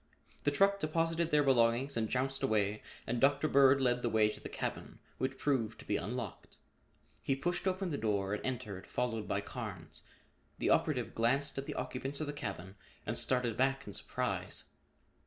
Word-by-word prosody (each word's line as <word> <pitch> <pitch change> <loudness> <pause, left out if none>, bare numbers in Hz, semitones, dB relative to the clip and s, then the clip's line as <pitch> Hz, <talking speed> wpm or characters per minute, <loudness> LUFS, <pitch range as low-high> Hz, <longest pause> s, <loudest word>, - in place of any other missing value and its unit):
The - - +5
truck 195 +7 +3
deposited 165 +1 +1
their 150 -1 +4
belongings 130 +1 +3
and 110 -2 0
jounced 135 +1 0
away 110 -5 +1 0.2
and 120 +1 -1
Dr. 145 +2 +4
Bird 135 -1 +6
led 125 -2 +2
the 120 - 0
way 110 -1 +4
to - - -7
the - - -8
cabin, - - -4 0.2
which 130 0 -1
proved 120 -6 0
to - - -12
be 105 - 0
unlocked. 110 +2 -5 0.6
He 135 - +1
pushed 175 +7 -1
open 185 -1 0
the 145 - -2
door 100 -2 0
and 105 - -3
entered, 115 -7 -4
followed 115 -3 -2
by 100 - 0
Carnes. 100 -9 -6 0.6
The - - +1
operative - - +2
glanced 135 +5 +1
at 135 - -6
the - - -4
occupants 130 +2 -4
of 155 - -1
the 145 - -4
cabin 95 -7 -6 0.3
and - - -2
started 125 -3 +1
back 135 +1 +1
in 100 - -8
surprise. - - -2
125 Hz, 180 wpm, -34 LUFS, 110-140 Hz, 0.6 s, Bird